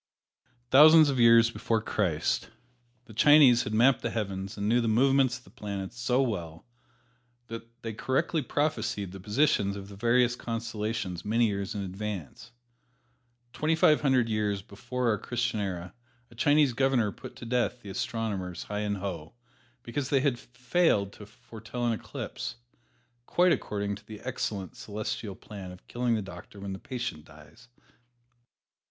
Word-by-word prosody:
Thousands 155 +2 +8
of 130 - -2
years 115 0 +6
before 115 -1 0
Christ, 95 -8 -1 0.6
the 110 - -13
Chinese 135 -1 +7
had 105 - -4
mapped 125 +3 +4
the 115 - -1
heavens 100 -3 -4
and 100 0 -2
knew 120 +3 +3
the 115 - -1
movements 130 +2 +3
of 125 - -18
the - - -18
planets 100 +1 -6
so 125 +2 +2
well 85 -9 -4 0.8
that 115 +1 -10
they 115 -1 -4
correctly 140 +8 0
prophesied 145 - -1
the 95 - -9
positions 105 -1 +1
of 100 0 -8
the 100 - -10
various 120 +3 +3
constellations 110 -6 -4
many 115 +3 +2
years 100 -1 -2
in 100 - -2
advance. 100 - -6 1.0
Twenty 155 +3 +1
five 155 -1 +4
hundred 130 -5 +3
years 105 -3 -1
before 125 +5 -4
our 105 -2 +1
Christian 120 -1 -2
era 90 -3 -4 0.4
a - - -14
Chinese 145 +2 +3
Governor 125 -4 +2
put - - -11
to - - -9
death 125 0 -1
the 100 - -7
astronomers 95 -5 -3
Hi 105 0 -4
and 105 -1 -1
Ho 90 -4 -6 0.5
because 130 +3 -3
they 135 -2 +3
had 135 -4 +1
failed 125 - 0
to 105 - -12
foretell 110 +2 -7
an 120 - +2
eclipse, 120 +2 -6 0.7
quite 180 0 +4
according 100 -8 -1
to 105 - -19
the 110 -1 -9
excellent 95 -3 -4
Celestial 105 -1 -5
plan 95 -2 -9
of 90 - -14
killing 120 -1 0
the 110 - -2
doctor 100 +1 -11
when 100 -1 -5
the 95 - -7
patient 120 - -5
dies. 75 +10 -17
115 Hz, 160 wpm, -28 LUFS, 100-125 Hz, 1.0 s, Thousands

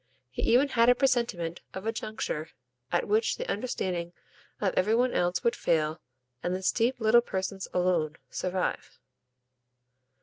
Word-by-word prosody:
He - - -4
even 260 +5 +4
had 235 -2 +4
a 245 - +6
presentiment 235 -11 0
of 190 +2 -6
a 225 - +1
juncture 215 -8 -4 0.4
at 175 - +1
which 215 +2 +2
the - - -4
understanding 185 -6 -2 0.5
of 195 -3 0
every 210 +4 +3
one 250 +1 +2
else 175 +5 +1
would 235 0 +2
fail 155 -1 0 0.4
and 180 +1 -1
this 185 0 +1
deep 240 +2 +1
little 225 +1 +5
person's 190 -3 -4
alone 175 -4 +1 0.2
survive. 185 0 -2
190 Hz, 145 wpm, -28 LUFS, 175-235 Hz, 0.5 s, a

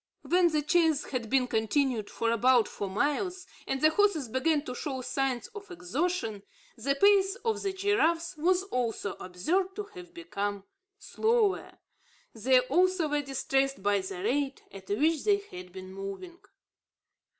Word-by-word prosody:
When 355 0 +4
the 305 -3 0
chase 320 -2 +3
had 240 -5 -3
been 265 -1 +3
continued 225 0 0
for 230 0 -1
about 240 0 +4
four 200 - -5
miles, 355 - -1 0.2
and 270 0 -2
the 310 - +5
horses 325 - +2
began 290 +5 +1
to 250 - -5
show 260 +1 -4
signs 260 -1 -1
of 420 -3 -10
exhaustion, 295 - -2 0.3
the 275 +5 -1
pace 390 +3 +4
of 450 -2 0
the 395 - -1
giraffes 380 -4 +1
was 360 +4 +2
also 240 - -2
observed 355 - -1
to 420 - -3
have 360 -2 -11
become 205 - -4 0.3
slower. 435 0 0 0.6
They, 250 +3 +4
also, 350 +5 +2
were 295 0 +1
distressed 270 -3 -1
by 205 0 +3
the 190 -1 -6
rate 270 +4 -1
at 190 -1 -12
which 300 +9 +1
they 410 -1 +4
had 180 - -10
been 185 0 -9
moving. 195 - -7
285 Hz, 150 wpm, -29 LUFS, 230-360 Hz, 0.6 s, the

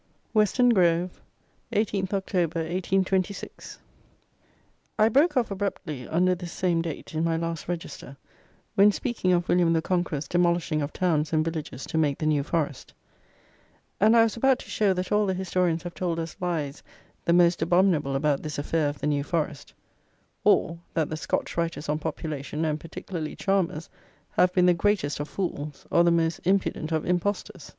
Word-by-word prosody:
Western 220 +3 +4
Grove, 175 -4 +2 0.5
18th 200 -3 0
Oct. 195 0 -3
1826. 185 +3 -1 1.2
I 215 0 +5
broke 290 +5 +3
off 235 -4 +1
abruptly, 185 - -4
under 180 +3 +2
this 175 -1 -6
same 175 -2 0
date, 165 -2 -6
in 160 +1 0
my 165 -1 +1
last 165 -1 -4
Register, 165 -5 -6 0.6
when 200 +1 +6
speaking 225 -5 -1
of 175 -1 +2
William 175 -2 +3
the 165 - +2
Conqueror's 165 -6 -1
demolishing 170 -2 +1
of 145 +1 -3
towns 155 -4 0
and 155 -1 +2
villages 155 -5 -5
to 160 - -1
make 145 -3 +1
the 155 - -3
New 150 -2 +2
Forest; 145 -2 -3 1.0
and 220 +3 +5
I 225 - +7
was 225 - 0
about 265 +2 +3
to - - -11
show 205 -2 +2
that 180 0 -4
all 210 0 +3
the 190 - 0
historians 180 -2 0
have 175 -1 -6
told 175 -3 -2
us 165 -1 -4
lies 160 -6 -2 0.4
the 170 - +2
most 175 -1 +4
abominable 170 -5 +2
about 145 0 +1
this 150 -2 -5
affair 150 +1 0
of 145 - -6
the - - -5
New 145 -1 +1
Forest; 150 -2 -3 0.7
or, 165 0 +3 0.2
that 160 -2 +1
the - - -1
Scotch 155 - -2
writers 170 -2 -2
on 150 +1 0
population, 155 -1 -4
and 155 -1 -1
particularly 165 0 -6
Chalmers, 185 -4 0 0.4
have 180 - +3
been 180 -1 +3
the 180 - +6
greatest 175 -5 0
of 145 - -4
fools, 150 -6 -4
or 170 - +5
the 175 - +4
most 165 -1 +1
impudent 180 -4 0
of 160 -1 0
impostors. 185 0 -2
170 Hz, 170 wpm, -26 LUFS, 155-185 Hz, 1.2 s, I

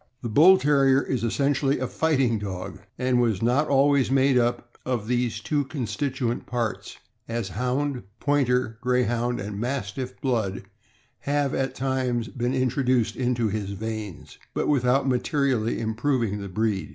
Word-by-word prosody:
The 120 - -3
Bull 170 - +7
Terrier 140 -3 +3
is 125 -4 -2
essentially 140 +3 +1
a 130 - -2
fighting 135 -6 +1
dog, 95 -3 -6 0.2
and 125 -1 +2
was 115 -4 0
not 130 +6 +2
always 140 -1 +3
made 135 0 +3
up 120 0 0
of 120 -5 -2
these 120 -2 0
two 145 +7 0
constituent 130 -1 -3
parts, 120 -3 -3 0.3
as 115 -3 -3
Hound, 125 +5 -1 0.2
Pointer, 125 -5 +1
Greyhound, 120 -1 0
and 100 0 -5
Mastiff 125 +1 -4
blood 110 -7 -1 0.6
have, 145 -1 0
at 135 0 -1
times, 130 -3 -1
been 125 0 -2
introduced 130 -2 +1
into 120 -3 0
his 100 -1 -3
veins, 105 -4 -6 0.2
but - - 0
without 135 -1 +2
materi 140 +2 +1
ally 115 -1 0
improving 110 -2 -1
the 100 - -6
breed. 100 -3 -1
125 Hz, 145 wpm, -25 LUFS, 115-135 Hz, 0.6 s, Bull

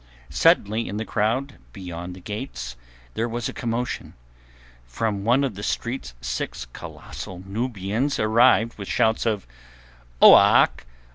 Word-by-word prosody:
Suddenly 110 +3 +3
in 100 - -4
the 110 - -3
crowd 130 +8 -1
beyond 90 -2 -7
the - - -11
gates 105 - -6 0.4
there 115 +1 -1
was 120 0 -3
a - - -6
commotion. 120 +1 -3 0.7
From 100 - -2
one 125 +6 +3
of 135 -5 -1
the 100 - -8
streets 120 - -3
six - - -4
colossal 90 -1 -9
Nubians 110 +4 -2
advanced 115 +1 +3
with 100 - -6
shouts 110 +1 +1
of— 105 -3 -1 0.7
"Oak! - - +6
110 Hz, 130 wpm, -24 LUFS, 95-120 Hz, 0.7 s, Oak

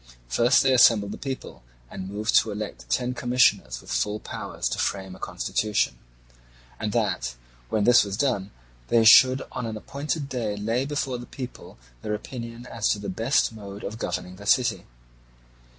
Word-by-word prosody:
First 115 - +4
they 135 -1 +4
assembled 115 -5 +5
the - - -6
people, 135 - -6 0.3
and 95 +9 -7
moved 105 +2 -2
to 115 - -3
elect 100 - -6
ten 125 - 0
commissioners 120 - +2
with - - -11
full 105 +1 0
powers - - -4
to - - -3
frame 95 -2 -2
a - - -15
constitution, 105 -1 -1 0.8
and - - -2
that - - -1 0.3
when 105 - +1
this 120 +2 +6
was 100 -1 -4
done 110 -8 0 0.4
they 115 -1 +4
should 130 +3 +8
on 120 - -4
an 110 -1 -4
appointed 140 +5 -4
day 115 -6 -3
lay 115 +5 -1
before 135 -4 -2
the 120 - -9
people 125 - -9 0.2
their 105 0 -2
opinion 115 +1 -8
as 115 -3 -1
to - - +2
the 100 - -6
best 115 +4 +1
mode 100 -2 -9
of 110 +3 -6
governing 90 -4 -4
the 105 +1 -10
city. 110 -6 +2
110 Hz, 170 wpm, -25 LUFS, 100-125 Hz, 0.8 s, should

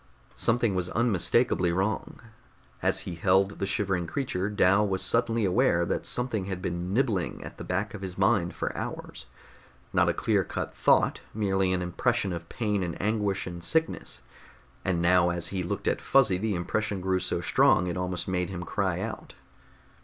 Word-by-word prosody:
Something 115 -2 +2
was 90 -1 -1
unmistakably 110 -4 +2
wrong. 95 +5 -2 0.6
As - - +1
he 90 - -6
held 95 +3 +2
the 100 - -1
shivering 95 -3 -1
creature, 105 - -2
Dal 100 0 +3
was 95 -1 -1
suddenly 115 -2 +2
aware 95 -3 +3
that - - -2
something 120 -6 -1
had 95 -1 -4
been 90 0 -3
nibbling 105 - 0
at - - -10
the - - -5
back 100 +3 -2
of 105 - -7
his 95 -2 -6
mind 95 -2 +2
for - - -3
hours. - - -6 0.7
Not - - +4
a - - +2
clear - - +1
cut - - -5
thought, - - +3
merely 95 -3 +1
an 90 -1 0
impression 100 +3 0
of 85 -1 -7
pain 105 -4 -1
and 85 -3 -4
anguish 105 -2 0
and 85 -1 -7
sickness, 160 - -1 0.6
and 85 -2 0
now 90 0 +4
as 85 -1 -2
he 95 -2 -2
looked 90 - -3
at - - +1
Fuzzy 110 -10 +3
the 105 -1 -1
impression 100 +3 -2
grew 95 0 0
so 90 - -1
strong 90 0 +3
it 90 - -2
almost 90 -1 -3
made 90 -1 -1
him 90 -2 -5
cry - - -1
out. - - -6
95 Hz, 175 wpm, -27 LUFS, 90-105 Hz, 0.7 s, Not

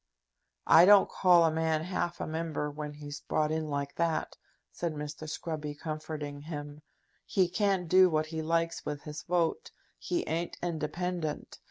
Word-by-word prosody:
"I 165 +2 +8
don't 200 0 +7
call 175 -3 +5
a 160 - +3
man 160 0 0
half 175 -1 -2
a - - -2
Member 160 -2 -3
when 150 0 -6
he's 145 0 -8
brought 155 0 0
in 155 -1 -2
like 140 -1 -3
that," 170 -1 0 0.4
said 170 -3 -3
Mr. 150 +1 -6
Scruby, 155 -2 -4
comforting 155 -2 -5
him. 145 -1 -7 0.4
"He 185 -2 +2
can't 190 -1 0
do 185 +2 +6
what 155 -1 +1
he 160 0 -4
likes 165 +1 0
with 145 -1 -5
his 150 -1 -6
vote. 175 - 0 0.3
He 345 -1 -2
ain't 170 +2 -2
independent. 170 -1 -3
160 Hz, 160 wpm, -30 LUFS, 150-170 Hz, 0.4 s, I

